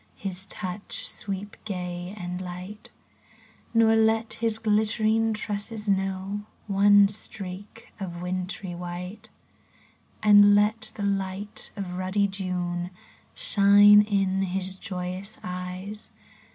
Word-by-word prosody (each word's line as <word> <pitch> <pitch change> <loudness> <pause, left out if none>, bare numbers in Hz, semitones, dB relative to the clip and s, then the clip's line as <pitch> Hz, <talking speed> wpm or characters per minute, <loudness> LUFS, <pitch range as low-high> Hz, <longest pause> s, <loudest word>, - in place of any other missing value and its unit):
His 190 -1 -3
touch 185 +1 -3
sweep 200 0 -5
gay 180 -1 -5
and 180 -1 -5
light; 185 +3 -8 0.8
Nor 225 -1 +5
let 225 0 +2
his 225 -1 -1
glittering 220 +1 +2
tresses 210 +1 -4
know 195 +1 -1 0.2
One 205 0 +6
streak 200 +1 -8
of 175 -3 -5
wintry 180 +1 -4
white. 180 +5 -7 0.9
And 205 -1 +8
let 210 +2 +1
the 205 - -4
light 195 +1 -3
of 185 -3 -5
ruddy 195 +2 +1
June 180 -2 -3 0.5
Shine 205 - +7
in 195 -2 +1
his 190 0 -2
joyous 185 +2 -5
eyes. 180 +3 -5
195 Hz, 105 wpm, -26 LUFS, 185-210 Hz, 0.9 s, And